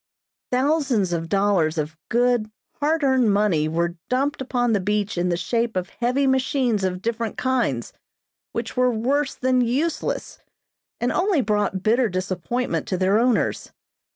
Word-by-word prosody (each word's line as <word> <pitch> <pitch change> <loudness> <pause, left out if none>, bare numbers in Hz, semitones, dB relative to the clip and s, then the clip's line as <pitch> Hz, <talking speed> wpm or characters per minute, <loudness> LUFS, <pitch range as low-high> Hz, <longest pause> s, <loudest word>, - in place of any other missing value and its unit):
Thousands 255 - +1
of 165 -1 -3
dollars 195 -5 +2
of 155 0 -2
good, 240 -2 +2 0.3
hard 310 +2 +1
earned 260 -5 +3
money 200 -7 +2
were 170 +2 -1
dumped 275 +2 0
upon 245 -3 0
the 205 - +2
beach 210 +2 -1
in 175 0 0
the 175 - 0
shape 230 +6 -1
of 185 0 -2
heavy 250 +4 0
machines 260 -5 +1
of 185 0 -2
different 230 -1 -2
kinds, 240 - -1 0.6
which 230 0 -4
were 250 0 +3
worse 265 +5 0
than 255 0 +2
useless, 270 +8 -1 0.6
and 245 - 0
only 365 -5 +2
brought 205 -3 0
bitter 235 +3 +3
disappointment 185 +6 -2
to 185 - -1
their 190 +3 +3
owners. 240 -2 0
230 Hz, 150 wpm, -23 LUFS, 190-255 Hz, 0.6 s, earned